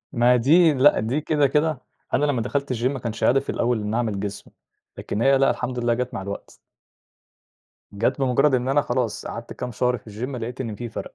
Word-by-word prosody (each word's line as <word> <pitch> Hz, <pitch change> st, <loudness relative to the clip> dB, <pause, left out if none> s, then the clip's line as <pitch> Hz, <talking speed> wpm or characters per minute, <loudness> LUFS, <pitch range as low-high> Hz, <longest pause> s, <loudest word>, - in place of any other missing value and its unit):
ما 120 Hz, +1 st, +4 dB
دي 155 Hz, +7 st, +5 dB
لأ، 140 Hz, +2 st, +5 dB
دي 120 Hz, +8 st, -1 dB
كده، 150 Hz, -2 st, +2 dB
كده 150 Hz, 0 st, 0 dB, 0.3 s
أنا -, -, +3 dB
لما 135 Hz, -6 st, 0 dB
دخلت 140 Hz, +2 st, -2 dB
الgym 120 Hz, 0 st, -1 dB
ما 135 Hz, +1 st, 0 dB
كانش 115 Hz, -2 st, -4 dB
هدفي 135 Hz, +2 st, +2 dB
الأول 120 Hz, -1 st, 0 dB
إني 105 Hz, +2 st, -2 dB
أعمل 110 Hz, -5 st, -1 dB
جسم. 100 Hz, -1 st, -6 dB, 0.5 s
لكن 105 Hz, -, -3 dB
هي 135 Hz, +1 st, +5 dB
لأ، 135 Hz, -, +4 dB
الحمد 125 Hz, +1 st, -3 dB
لله 120 Hz, -1 st, +1 dB
جت 125 Hz, +1 st, -3 dB
مع -, -, -4 dB
الوقت. 100 Hz, +1 st, -8 dB, 1.4 s
جت 115 Hz, +6 st, 0 dB
بمجرد 135 Hz, +2 st, +3 dB
إن 125 Hz, 0 st, 0 dB
أنا 140 Hz, +2 st, +3 dB
خلاص، 120 Hz, -5 st, -2 dB
قعدت 115 Hz, 0 st, -7 dB
كام 125 Hz, -1 st, -6 dB
شهر 125 Hz, +2 st, +1 dB
في 110 Hz, -, -14 dB
الgym 115 Hz, +5 st, -5 dB
لقيت 120 Hz, +2 st, -6 dB
إن 115 Hz, -4 st, -3 dB
في 120 Hz, +3 st, -6 dB
فرق، -, -, -7 dB
125 Hz, 210 wpm, -23 LUFS, 115-135 Hz, 1.4 s, دي